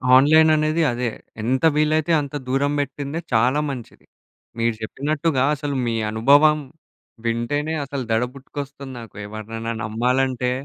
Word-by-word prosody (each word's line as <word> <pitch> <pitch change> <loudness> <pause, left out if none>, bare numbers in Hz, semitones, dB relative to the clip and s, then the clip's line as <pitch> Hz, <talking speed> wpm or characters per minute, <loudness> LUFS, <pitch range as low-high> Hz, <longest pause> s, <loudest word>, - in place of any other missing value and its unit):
Online 155 +4 +6
అనేది 155 +2 +1
అదే, 120 0 -1 0.3
ఎంత 130 +7 +1
వీలైతే 155 +2 +2
అంత 140 +1 -7
దూరం 140 +2 +1
పెట్టిందే 145 +2 -3
చాలా 125 +6 +3
మంచిది. 125 -5 -8 0.5
మీరు 115 0 +1
చెప్పినట్టుగా 145 +4 -1
అసలు 145 -1 -3
మీ 115 - 0 0.2
అనుభవం 145 +7 +5 0.7
వింటేనే 145 +7 -1
అసలు 135 -1 -4
దడ 110 +2 +3
పుట్టుకొస్తుంది 140 0 -8
నాకు 115 - -12
ఎవరినైనా 115 +2 -5
నమ్మాలంటే. 125 +3 0
135 Hz, 125 wpm, -22 LUFS, 120-150 Hz, 0.7 s, Online